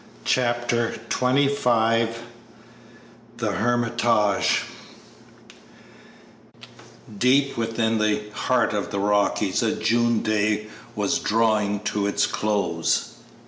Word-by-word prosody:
Chapter 120 -1 0
XXV 125 -3 +2 1.3
THE - - -1
"HERMITAGE" 120 -3 +1 2.5
Deep 135 +5 +2
within 115 -1 -1
the 105 0 0
heart 125 +2 0
of 105 -1 -2
the 100 -1 -3
Rockies 100 -1 +1
a - - 0
June 120 0 +1
day 105 0 0 0.3
was 105 -2 0
drawing 105 -2 +1
to 105 -1 -1
its 100 - +1
close. 100 -6 -1
110 Hz, 85 wpm, -23 LUFS, 105-120 Hz, 2.5 s, XXV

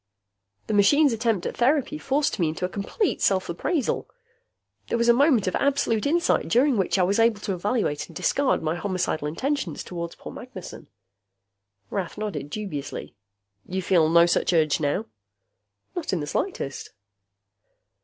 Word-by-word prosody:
"The - - -3
machine's 275 +7 +5
attempt 225 -5 0
at - - -4
therapy 285 +4 +1
forced 280 -4 0
me 165 -3 +2
into 165 +3 -3
a - - -3
compete 220 - -2
self 190 -1 +2
appraisal. 255 - -1 0.8
There - - 0
was 235 0 +1
a - - +8
moment 265 -3 +4
of 185 - -1
absolute 275 -5 +1
insight, 340 +4 +2
during 260 +3 +3
which 195 -2 +1
I 185 - +3
was 200 +4 +1
able 225 -2 +3
to 195 - -2
evaluate 185 - -1
and 165 - -15
discard 280 - +1
my 155 0 0
homicidal 180 -5 -2
intentions 255 - -2
toward 170 -2 -6
poor - - -9
Magnessen." - - -9 1.0
Rath 190 -2 -3
nodded 210 -8 -4
dubiously. 175 -6 -5 0.5
"You 190 +1 -3
feel 165 -3 +3
no 170 +1 +6
such 175 +1 +1
urge 155 -3 +3
now?" 155 +8 0 0.9
"Not 350 - -3
in 180 - +1
the 145 - -3
slightest." 145 - -3
200 Hz, 155 wpm, -25 LUFS, 170-260 Hz, 1.0 s, a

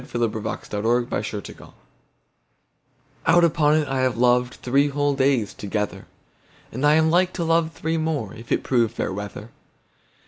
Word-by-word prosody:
The 120 -2 -1
Constant 105 -1 -5
Lover 110 -3 -2 1.6
OUT 175 - +5
upon 155 -2 +3
it, 155 -2 0
I 135 -1 -1
have 130 -2 +1
lovedThree 125 +3 +2
whole 145 0 0
days 135 -5 +1
together! 105 +1 -4 0.6
And 130 +5 -5
am 155 +2 +4
like 180 +2 +2
to 170 - -3
love 165 0 +1
three 160 +1 -2
more, 155 -10 -2
If 115 +1 -12
it - - +1
prove 120 -4 +1
fair 105 - -3
weather. 105 +3 -7
130 Hz, 140 wpm, -23 LUFS, 115-155 Hz, 1.6 s, OUT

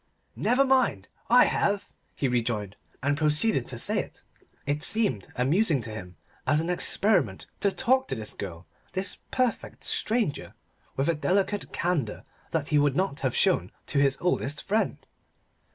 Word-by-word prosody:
"Never 265 +3 +3
mind; 255 - +2 0.2
I 245 +1 +7
have," 200 0 0 0.3
he 140 - 0
rejoined, 115 -5 -1 0.3
and 145 +1 +2
proceeded 150 - +2
to - - -5
say - - +1
it. - - -7 0.4
It 145 +1 -1
seemed 205 - +3
amusing 155 - +3
to 115 - -6
him 90 -5 -8 0.3
as 145 +3 +4
an 165 +2 -1
experiment 200 +3 +1
to 200 - +2
talk 260 +4 +2
to - - -2
this 110 -2 -5
girl, 90 -3 -7 0.3
this 190 +1 -1
perfect 255 -2 -1
stranger, 220 - -1 0.4
with 135 - +1
a 170 - +3
delicate 195 +5 0
candour 160 -11 -1 0.3
that 155 -3 -2
he 150 - +4
would 145 -2 +2
not 185 -5 0
have 130 -3 -1
shown 190 -2 +2
to 140 - 0
his 140 -1 +3
oldest 150 -5 -1
friend. 215 +3 -1
155 Hz, 155 wpm, -27 LUFS, 130-205 Hz, 0.4 s, I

